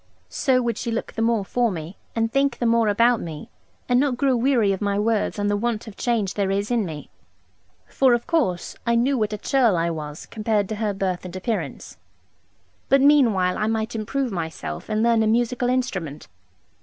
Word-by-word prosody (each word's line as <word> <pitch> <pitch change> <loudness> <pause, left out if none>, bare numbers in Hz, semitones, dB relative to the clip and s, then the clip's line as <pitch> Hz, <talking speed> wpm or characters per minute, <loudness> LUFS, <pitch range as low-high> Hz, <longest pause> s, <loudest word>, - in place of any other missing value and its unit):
So 255 -2 +1
would 235 -2 -2
she - - -3
look 230 0 -3
the 225 - -3
more 225 -3 +1
for 240 +3 +1
me 165 +1 -6 0.2
and 225 0 0
think 275 -1 +1
the 240 - -2
more 230 -1 +3
about 230 +3 +3
me, 155 -3 -8 0.4
and 245 0 +3
not 270 -3 +1
grow 270 -1 +2
weary 240 -4 +2
of 190 - -5
my 200 -1 0
words 215 0 0
and 205 0 0
the 205 - +1
want 225 +1 -2
of 220 -3 -10
change 220 -6 -1
there 200 -2 -1
is 200 +3 -1
in 230 -5 +1
me. 150 - -8 0.7
For, 260 -3 +3
of 240 - -4
course, 285 - 0
I 235 - +3
knew 255 +4 +2
what 215 -4 0
a 210 - -3
churl 235 -6 +2
I 170 +1 0
was 150 -1 -6
compared 215 -2 -1
to 215 - -3
her 210 -2 -1
birth 185 -2 -2
and 180 0 -8
appearance; 210 +4 -4 0.9
but 275 - +5
meanwhile 230 -11 +4
I 215 - 0
might 220 +1 -1
improve 235 +4 -2
myself 160 - -5
and 215 +1 +1
learn 230 -1 +3
a 220 - +2
musical 240 +2 +1
instrument. 195 - -2
220 Hz, 205 wpm, -23 LUFS, 195-240 Hz, 0.9 s, but